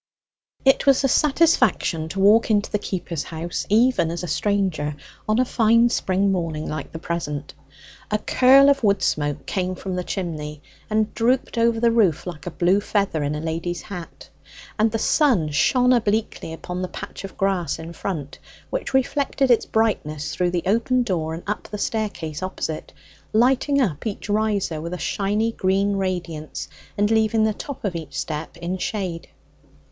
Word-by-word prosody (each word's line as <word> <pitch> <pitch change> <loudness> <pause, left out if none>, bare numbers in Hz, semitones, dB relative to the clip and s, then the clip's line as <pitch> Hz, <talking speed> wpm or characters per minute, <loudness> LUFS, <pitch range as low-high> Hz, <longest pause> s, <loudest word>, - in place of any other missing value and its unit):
It 270 +1 +4
was 275 0 +5
a - - +4
satisfaction 265 - +2
to 195 - -4
walk 210 +4 +5
into 205 -2 +1
the 210 - 0
keeper's 175 -6 -4
house, 170 +1 -4
even 225 -4 +3
as 170 +2 -4
a - - -3
stranger, 180 -4 0 0.3
on 215 - +3
a 255 - +3
fine 230 0 +4
spring 195 -3 +1
morning 165 -4 -2
like 155 -2 -5
the - - -6
present. 160 -3 -4 0.6
A 210 - +1
curl 265 +5 +5
of 275 -3 0
wood 200 -2 +3
smoke 145 -1 -1
came 185 -1 -2
from 185 0 -5
the 180 - -2
chimney, 155 -6 -5 0.3
and 215 0 +1
drooped 250 +3 +1
over 230 -1 +2
the 235 0 +3
roof 205 -9 +2
like 175 -3 -7
a - - 0
blue 180 +3 +2
feather 200 -7 0
in 145 +1 -1
a - - -3
lady's 165 +2 -3
hat; 180 -5 -9 0.5
and 220 +1 +4
the 225 - 0
sun 220 - +2
shone 250 - +3
obliquely 215 -7 0
upon 180 +3 -5
the 185 - -2
patch - - -8
of 195 - -9
grass 195 -3 0
in 165 +1 -8
front, 155 -6 -5 0.3
which - - -2
reflected 270 0 +1
its 235 - +3
brightness 155 -10 0
through 180 -1 +1
the 175 -1 -1
open 235 +5 +2
doorway 165 -7 -2
and 170 - -9
up 210 - -3
the 210 - -5
staircase 200 -8 -3
opposite, 185 -4 -4 0.4
lighting 265 +5 +3
up 190 - 0
each 210 0 -5
riser 205 -6 0
with 170 +2 -4
a - - -5
shiny 210 +5 0
green 195 0 +1
radiance, 175 -5 -3 0.3
and 205 +1 +2
leaving 220 0 +3
the 220 0 +2
top 280 +1 -7
of 190 -4 -2
each 145 -5 -5
step 155 +4 -5
in 175 +2 -4
shade. 180 -5 -3
195 Hz, 175 wpm, -23 LUFS, 165-225 Hz, 0.6 s, was